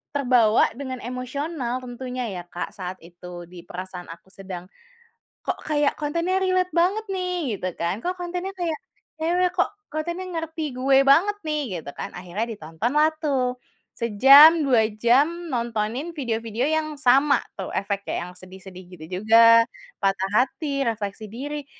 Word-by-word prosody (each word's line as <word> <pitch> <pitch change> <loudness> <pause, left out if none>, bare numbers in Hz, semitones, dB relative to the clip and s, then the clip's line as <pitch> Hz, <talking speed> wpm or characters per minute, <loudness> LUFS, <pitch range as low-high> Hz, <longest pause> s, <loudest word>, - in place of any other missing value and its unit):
terbawa 245 -5 +4
dengan 260 -2 -5
emosional 255 +1 -4
tentunya 250 +1 -5
ya, 180 -2 -6
Kak, 175 0 -5
saat 185 -1 -6
itu 175 +1 -10
di 175 -1 -12
perasaan 180 0 -7
aku 170 +3 -12
sedang, 190 -1 -9 0.8
"Kok - - -3
kayak 295 -2 +1
kontennya 335 +6 -1
relate 370 -1 +1
banget 390 +6 +2
nih," 360 - -2
gitu 185 -1 -4
kan, 175 +6 -2
"kok 365 0 -3
kontennya 355 +2 -4
kayak 325 -4 -2 0.4
cewek, 345 +3 +1
kok 365 - +1 0.2
kontennya 340 +4 -4
ngerti 320 -5 -4
gue 270 +1 +3
banget 370 +9 +5
nih." 285 - -2
Gitu 145 - -9
kan, - - -6
akhirnya 180 +4 -4
ditontonlah 225 - 0
tuh. 255 -4 0 0.4
Sejam, 275 +9 +8
2 250 -6 +3
jam 285 +10 +2
nontonin 235 +5 -2
video-video 230 -4 -2
yang 315 -1 0
sama 275 +2 +4 0.2
tuh 190 - -5
efeknya, 200 -3 -3
yang - - -11
sedih-sedih 185 0 -11
gitu 155 -3 -10
juga, 230 +2 +7 0.3
patah 195 -1 0
hati, 275 0 -3
refleksi 215 -2 -3
diri. 285 +7 -6
255 Hz, 145 wpm, -24 LUFS, 200-310 Hz, 0.8 s, Sejam